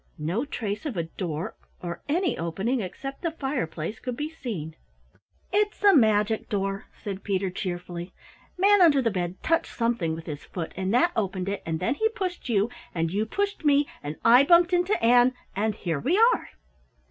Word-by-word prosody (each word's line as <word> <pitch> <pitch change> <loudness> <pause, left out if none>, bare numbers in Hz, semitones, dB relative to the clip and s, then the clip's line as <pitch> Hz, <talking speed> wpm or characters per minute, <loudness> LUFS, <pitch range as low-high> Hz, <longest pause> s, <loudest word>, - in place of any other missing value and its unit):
No 180 - -1
trace 215 -3 -4
of 245 -10 -4
a 170 - +1
door 165 -1 -4 0.3
or 170 -1 -6
any 350 +4 +1
opening 195 +10 -1
except 270 +8 -6
the 340 - 0
fireplace 235 - -3
could 250 -2 -5
be 300 +1 -3
seen. 195 - -6 0.8
"It's 415 0 +1
a 400 -1 +7
magic 220 -3 +3
door," 195 -1 -2 0.2
said 195 -2 -5
Peter 190 -2 -1
cheerfully. 175 -1 -5 0.5
"Manunderthebed 275 - +3
touched 330 +1 +1
something 230 -9 0
with 165 0 -9
his 150 -2 -6
foot 170 -3 -5
and 190 +1 -2
that 250 +9 +4
opened 195 -3 -1
it 200 - -3
and 160 -1 -1
then 185 - +1
he 440 +10 +1
pushed 370 - -4
you 210 -2 +3 0.3
and 165 -1 0
you 215 +2 0
pushed 405 - -2
me 290 -1 +4
and 145 +1 -5
I 245 +4 +8
bumped 345 +4 +5
into 360 +4 +2
Ann, 245 +2 +5 0.2
and 210 +1 0
here 165 -8 -2
we 335 - +1 0.2
are." - - -4
220 Hz, 170 wpm, -26 LUFS, 180-290 Hz, 0.8 s, I